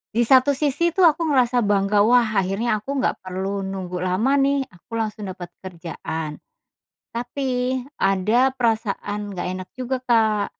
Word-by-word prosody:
Di 240 - +4
satu 260 +3 +5
sisi 300 +4 0
tuh 380 - +3
aku 330 0 +4
ngerasa 250 -4 +3
bangga 205 -2 +2
wah 240 +4 +5 0.2
akhirnya 205 +4 0
aku 275 +7 -5
nggak 265 - 0
perlu 190 +2 -4
nunggu 190 -2 -4
lama 200 +10 +1
nih 275 0 +2
aku 175 +6 -11
langsung 215 -2 -3
dapat 180 -2 -7
kerjaan. 165 -3 -6 0.8
Tapi 250 +1 -1 0.2
ada 215 +5 +2
perasaan 215 -4 -2
nggak 185 -3 -4
enak 185 0 -7
juga 255 0 -2
Kak, 220 -4 +2
220 Hz, 145 wpm, -22 LUFS, 195-260 Hz, 0.8 s, satu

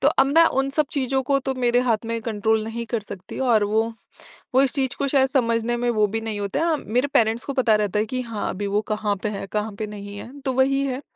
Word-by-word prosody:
तो 280 - +6
अब 270 -3 +3
मैं 325 +4 +5 0.2
उन 270 - -1
सब 300 +1 +1
चीजों 265 -2 0
को 275 +1 +2
तो 265 - 0
मेरे 245 0 +3
हाथ 230 -3 0
में 230 0 -1
कंट्रोल 220 0 0
नहीं 230 +1 -4
कर 230 -1 -2
सकती 195 -2 -9
और 215 -3 +4
वो 220 +2 0 0.6
वो 265 - +7
इस 270 -2 +2
चीज़ 265 -3 0
को 280 - 0
शायद 270 -1 +3
समझने 235 -2 +1
में 240 0 0
वो 215 -2 +3
भी 225 +2 -3
नहीं 220 -2 -4
होता 205 - -1
है। 325 - +2
मेरे 250 +6 0
पेरेंट्स 225 +1 +2
को 280 - -3
पता 245 -5 +3
रहता 210 -1 0
है 215 - +1
कि 255 +3 -3
हाँ, 230 -4 -4
अभी 200 +2 -3
वो 205 +1 +1
कहाँ 210 -1 0
पे 215 - 0
है, 200 -1 -4
कहाँ 210 +2 -2
पे 215 - -2
नहीं 205 -1 -8
है, 235 - -8
तो 265 -2 -1
वही 270 +1 +2
है 260 +1 -3
230 Hz, 265 wpm, -23 LUFS, 215-265 Hz, 0.6 s, वो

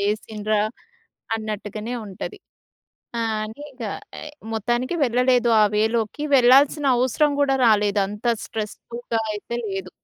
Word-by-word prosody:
లేసిండ్రా 210 +1 0 0.7
అన్నట్టుగనే 215 +1 -5
ఉంటది. 200 - -7 0.8
ఆ! - - 0 0.2
అని 220 +7 -9
ఇక 255 -2 -10 0.4
ఆహ్, 300 - -9 0.2
మొత్తానికి 240 - -1
వెళ్ళలేదు 245 0 +3
ఆ - - +7
వే 215 - +4
లోకి. 230 +6 -2
వెళ్ళాల్సిన 270 +4 +5
అవసరం 260 +4 +2
గూడా 270 -1 +3
రాలేదు. 205 -2 +3
అంత 210 +4 -7 0.2
స్ట్రెస్‌ఫుల్‌గా 225 +2 -4
అయితే 220 +3 -5
లేదు. 195 -2 -4
225 Hz, 120 wpm, -23 LUFS, 210-250 Hz, 0.8 s, ఆ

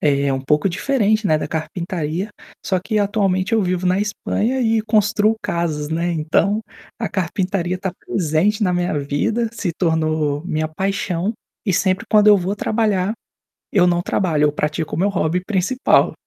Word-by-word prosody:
é 140 -2 +2
um 135 - -1
pouco 150 +7 +1
diferente, 215 +1 +1
né, 155 - +3
da - - -3
carpintaria, 165 +3 -3 0.4
só 185 -2 +1
que, 210 +4 -1
atualmente, 200 -1 +1
eu 225 -2 +3
vivo 180 0 -1
na 185 +2 +2
Espanha 210 +4 -1
e 225 -2 +2
construo 215 0 +2
casas, 155 -3 -2
né. 170 +2 0
Então, 165 +7 +1 0.4
a 225 - -2
carpintaria 185 -1 -1
está 190 0 -3
presente 185 +4 0
na 180 - +2
minha 175 -4 0
vida, 180 +12 -1
se 205 -6 -2
tornou 155 -3 0
minha 155 -3 -1
paixão. 190 +2 -2 0.3
E 195 - +1
sempre 190 0 +1
quando 210 -1 +5
eu 210 - +8
vou 190 +2 -1
trabalhar, 210 -3 0 0.6
eu 185 -3 +4
não 175 -1 +2
trabalho, 165 -5 0
eu 150 - +4
pratico 150 +1 -2
o - - -2
meu 200 +3 +2
hobby 180 -2 0
principal. 215 +6 +2
185 Hz, 165 wpm, -20 LUFS, 160-205 Hz, 0.6 s, eu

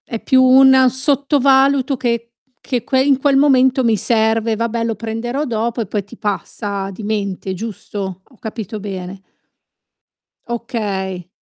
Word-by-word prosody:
È 230 - -4
più 260 -2 +4
un 260 0 +6
sottovaluto 275 0 +2
che 235 -2 -1 0.3
che 245 -4 -2 0.2
in 275 0 +3
quel 275 0 +2
momento 265 -2 +4
mi 230 -2 +3
serve: 220 +1 +1
"Vabbè 230 +1 -2
lo 230 0 -1
prenderò 230 +6 -3
dopo," 235 -1 -2
e 220 - -4
poi 205 +1 -2
ti 205 +5 -14
passa 200 -1 -4
di 195 - -10
mente, 200 -3 -3
giusto? 195 -2 -6
Ho 255 - -25
capito 220 -2 -6
bene? 190 -1 -7 1.3
Okay. 200 -7 -4
230 Hz, 135 wpm, -18 LUFS, 205-260 Hz, 1.3 s, un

